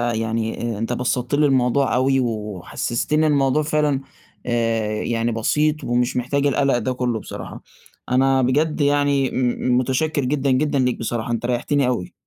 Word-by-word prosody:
يعني، 115 0 -2
أنت 115 +3 -2
بسَّطت 125 +2 -1
لي 150 0 +3
الموضوع 130 0 +2
أوي 135 +1 +2
وحسّستني 115 - -1
الموضوع 140 0 +2
فعلًا، 150 -2 0 0.4
آآ 115 -3 0
يعني 115 0 -1
بسيط 150 +7 0
ومش 120 +1 0
محتاج 140 +3 0
القلق 140 -2 +2
ده 130 +1 -2
كُلّه 125 -3 -1
بصراحة، - - -8 0.5
أنا 135 +1 +3
بجد 150 +5 +1
يعني 145 -2 +2
م 125 0 0
متشكِّر 135 +3 0
جدًا، 135 0 0
جدًا 145 +2 +1
ليك. 125 -1 0
بصراحة 115 0 -3
أنت 115 0 -2
ريّحتني 125 +2 0
أوي. 120 -8 -2
125 Hz, 145 wpm, -21 LUFS, 120-140 Hz, 0.5 s, لي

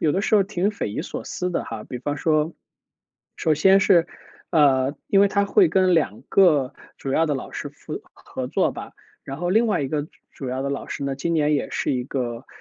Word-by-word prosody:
有 155 - +2
的 195 - 0
时 215 - +1
候 205 - +6
挺 195 0 -1
匪 210 - -4
夷 105 - -3
所 - - -6
思 180 0 -3
的 175 - -1
哈。 110 -2 -7
比 125 - -6
方 145 +4 -3
说 155 +1 +1 0.8
首 160 - +1
先 190 +6 +5
是， 185 -3 +4 0.4
呃， 140 -3 +3
因 195 - +4
为 200 - +5
他 200 0 +1
会 365 - +4
跟 185 -5 +3
2 145 -10 0
个 150 -9 +4 0.2
主 135 - -4
要 165 +4 +3
的 150 - 0
老 135 - -6
师 - - -5
合 - - -8
合 130 - -6
作 - - +1
吧， - - -9 0.3
然 135 - -6
后 175 +4 -2
另 225 +5 +3
外 210 -9 +1
一 - - -1
个 150 +1 -2 0.2
主 135 - -7
要 130 +1 -2
的 140 - -2
老 140 - -4
师 140 - -4
呢， 140 -1 -1
今 170 +5 -2
年 150 -1 +2
也 145 - -1
是 - - -1
一 125 -2 -1
个， 120 -2 -4
150 Hz, 245 characters per minute, -23 LUFS, 135-185 Hz, 0.8 s, 候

